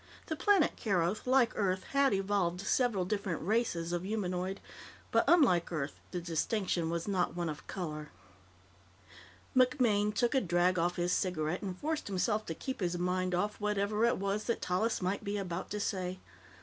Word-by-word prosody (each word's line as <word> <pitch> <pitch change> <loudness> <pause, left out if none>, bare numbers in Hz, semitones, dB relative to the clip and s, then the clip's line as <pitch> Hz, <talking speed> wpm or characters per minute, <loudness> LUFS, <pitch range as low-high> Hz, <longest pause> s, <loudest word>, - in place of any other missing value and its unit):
The 315 - -3
planet 390 -1 +3
Keroth, 190 +1 0
like 255 -3 +4
Earth, 185 -2 0
had 275 -1 +4
evolved 195 -3 0
several 210 -3 +1
different 195 -3 -2
"races" 175 -4 0
of 175 - 0
humanoid, 190 -2 -2 0.5
but, - - +4
unlike 235 - +4
Earth, 150 -3 -2 0.2
the 180 - -3
distinction 175 +1 -1
was 170 +2 -2
not 185 -4 0
one 175 -2 -1
of 150 - -7
color. 155 -5 -5 1.5
MacMaine 245 -5 +3
took 235 +3 +1
a 265 - +3
drag 175 -1 +2
off 175 +1 +1
his 175 +1 0
cigarette 175 -2 -1
and 190 -3 -4
forced 310 +5 -2
himself 210 +2 0
to 165 - -3
keep 265 +9 -5
his 175 -2 -1
mind 180 0 0
off 210 +4 -1
whatever 210 +1 0
it 235 - +3
was 200 +2 -1
that 235 - 0
Tallis 185 +3 0
might 190 +4 -1
be 205 0 -2
about 185 -2 -4
to 210 - -3
say. 185 -2 -2
190 Hz, 170 wpm, -32 LUFS, 175-215 Hz, 1.5 s, like